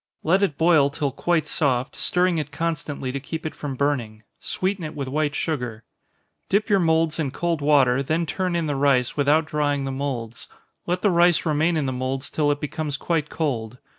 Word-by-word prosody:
Let 185 +5 +3
it 160 -8 +1
boil 160 -4 +4
till 145 -1 -2
quite 165 +4 0
soft, 130 -4 0
stirring 180 -2 +1
it 150 -1 -5
constantly 150 -4 -3
to 140 - -3
keep 160 +4 -6
it 155 - -3
from 140 -3 -5
burning 125 -6 -1 0.2
sweeten 190 -1 -2
it 155 - -6
with 140 -2 -4
white 150 +2 -1
sugar. 125 -8 -3 0.7
Dip 205 +2 +1
your 200 - +5
moulds 160 -2 +2
in 150 -4 0
cold 170 +2 -2
water, 135 -3 +4
then 160 +5 0
turn 180 +2 -2
in 170 -1 0
the 145 -2 -1
rice, 135 -3 +2
without 150 +2 +3
drying 145 -2 0
the 135 - -3
moulds. 130 -4 -4 0.4
Let 180 +1 -1
the 205 - +4
rice 175 0 +4
remain 160 +2 +2
in 150 - 0
the 130 - -1
moulds 130 +2 -3
till 150 -2 +1
it 145 0 +1
becomes 150 -1 -3
quite 160 -2 -1
cold. 125 -7 -2
150 Hz, 195 wpm, -23 LUFS, 135-165 Hz, 0.7 s, your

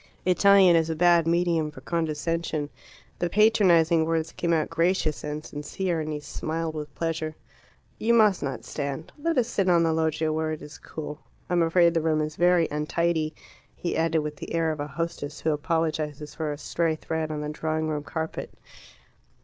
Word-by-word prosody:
Italian 190 -1 +6
is 165 -1 +2
a 160 - -1
bad 170 0 +4
medium 170 -2 +2
for 150 - -12
condescension. 160 -2 -2 0.5
The 175 - 0
patronizing 180 -6 +4
words 165 0 -1
came 170 - -2
out 160 -2 +2
gracious 165 -2 +1
and 150 +1 -4
sincere, 165 +4 -3
and 155 0 -4
he 150 - -3
smiled 160 +2 -4
with 150 -1 -7
pleasure. 160 -1 -2 0.6
"You 235 +1 +3
must 210 -4 +4
not 135 -3 -4
stand. 140 +1 -4
Let 330 0 0
us 240 -3 +3
sit 195 -6 0
on 170 -1 +5
the 165 -1 +2
loggia, 160 -1 0
where 155 0 -1
it 155 - -7
is 150 - -11
cool. 150 -1 -7 0.3
I - - +2
am 175 - +3
afraid 170 +1 +4
the 165 - +1
room 155 -1 +1
is 155 0 -3
very 175 -1 +4
untidy," 155 +1 0 0.4
he 175 - -3
added, 165 -1 +2
with 150 0 -5
the - - -6
air 165 -1 +2
of 155 - -5
a 145 - -3
hostess 150 0 -4
who 160 - +1
apologizes 150 -1 -2
for 155 -2 -3
a 145 - -5
stray 165 +1 -1
thread 160 0 -3
on 150 -1 -3
the 150 - -3
drawing 155 +1 -2
room 150 -1 -2
carpet. 160 +2 -5
160 Hz, 190 wpm, -26 LUFS, 155-170 Hz, 0.6 s, Italian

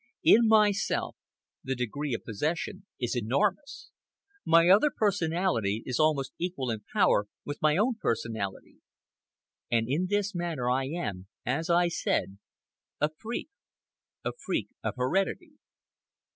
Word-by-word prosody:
In 230 0 +6
myself, 210 -2 +2 0.5
the 135 0 -2
degree 125 +3 -2
of - - -7
possession 170 - -3
is 120 -1 -1
enormous. 190 - -1 0.5
My 165 +1 +5
other 205 +11 +6
personality 170 - 0
is 125 - -2
almost 145 -4 +2
equal 165 -9 -2
in 110 - -3
power 100 - +3 0.2
with 145 - -6
my 155 +1 +3
own 225 +3 +2
personality. 110 -4 -3 0.9
And 115 -1 +2
in 155 +8 0
this 205 0 0
matter 165 -9 -1
I 130 +1 +1
am, 105 - -4 0.2
as 160 +8 -1
I 175 +1 +4
said, 100 - -1 0.6
a 150 +1 +1
freak—a 235 - -8
freak - - -1
of - - -2
heredity. 195 - 0
155 Hz, 125 wpm, -29 LUFS, 125-195 Hz, 0.9 s, In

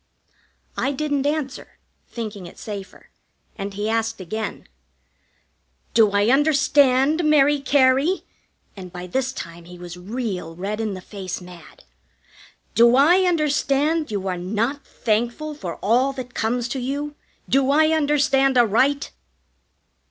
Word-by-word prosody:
I 275 - -1
didn't 285 -1 -1
answer, 290 -2 -4 0.3
thinking 210 -6 -6
it - - -14
safer, 205 -3 -9 0.4
and 200 0 -6
he 205 +1 -2
asked 225 0 -1
again: 215 +4 -5 1.3
"Do 225 -2 +5
I 200 +2 +2
understand, 285 +1 +3
Mary 295 -1 +4
Cary" 275 +5 +3 0.5
and 185 -3 -9
by 180 0 -7
this 260 +8 -1
time 170 -8 -9
he 180 +1 -12
was 175 0 -9
real 190 -4 -5
red 205 +5 -3
in 215 -3 -2
the 185 - -8
face 190 -1 -6
mad 180 -2 -14 0.9
"do 235 +1 +6
I 345 +8 +5
understand 305 -1 +1
you 200 -3 -3
are 180 -2 -2
not 220 +10 -2
thankful 240 +8 -2
for 185 - -6
all 250 +6 +2
that 250 -2 -8
comes 235 +2 -1
to 265 - -3
you? 285 +4 -3 0.3
Do 270 0 +2
I 310 +2 +4
understand 285 -4 +2
aright?" 255 +5 +2
245 Hz, 130 wpm, -22 LUFS, 200-285 Hz, 1.3 s, do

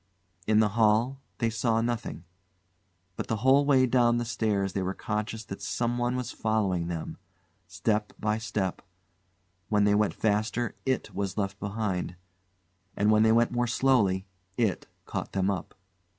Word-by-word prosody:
In 110 0 +5
the 105 - +3
hall 115 +5 +2 0.2
they 115 -2 0
saw 115 0 +1
nothing, 115 -6 -3 0.9
but - - -4
the 115 - 0
whole 140 +2 +5
way 130 -3 +5
down 120 -1 +3
the 120 - -1
stairs 100 -5 0
they 95 - -1
were 95 +1 -2
conscious 110 +1 -3
that 95 - -7
someone 120 +1 -1
followed 105 -8 -1
them; 85 -2 -5 0.5
step 105 -1 -1
by 105 +1 0
step; 100 -4 -2 0.9
when 105 -1 +3
they 100 0 +4
went 105 0 +2
faster 110 +2 0
IT 130 - -1
was 100 0 -3
left 100 -2 -2
behind, 100 -4 -2 0.8
and 105 +1 +3
when 110 0 +5
they 110 0 +5
went 115 +1 +3
more 120 0 0
slowly 110 -7 +2 0.3
IT 110 -6 0 0.2
caught - - -5
them 95 +1 +1
up. 95 - -5
110 Hz, 150 wpm, -28 LUFS, 100-120 Hz, 0.9 s, In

